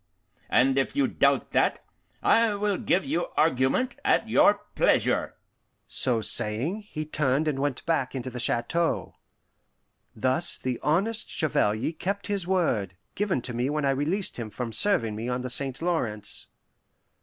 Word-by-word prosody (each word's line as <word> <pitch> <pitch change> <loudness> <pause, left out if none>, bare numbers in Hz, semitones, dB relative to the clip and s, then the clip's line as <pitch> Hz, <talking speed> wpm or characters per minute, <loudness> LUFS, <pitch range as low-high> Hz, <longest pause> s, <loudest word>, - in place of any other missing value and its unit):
And 135 +2 +3
if 135 - -2
you 285 -1 +2
doubt - - +1
that, - - +1 0.4
I 225 -2 +4
will 205 -1 -1
give 185 - +1
you 160 +6 -1
argument 155 - +1
at - - +2
your - - +4
pleasure;" - - +1 0.5
so 120 -4 +2
saying, 140 - 0
he 155 0 -4
turned 150 0 0
and 140 -3 -1
went 140 -2 -2
back 140 -6 0
into 130 0 -4
the 125 - -6
chateau. 160 +9 0 1.0
Thus 130 +9 +2
the 125 -2 -3
honest 205 +9 0
Chevalier 110 -5 0
kept 200 +5 -3
his 200 -4 -1
word, 115 - 0 0.2
given 190 - -1
to 125 - -5
me 120 +3 -1
when 150 -1 -1
I 135 - +3
released 160 +9 -2
him 115 -3 -5
from 115 +1 -5
serving 115 - +2
me 115 +3 -4
on 125 0 -2
the 125 -1 -4
St. 135 0 -2
Lawrence. 120 -12 -3
140 Hz, 155 wpm, -26 LUFS, 125-180 Hz, 1.0 s, I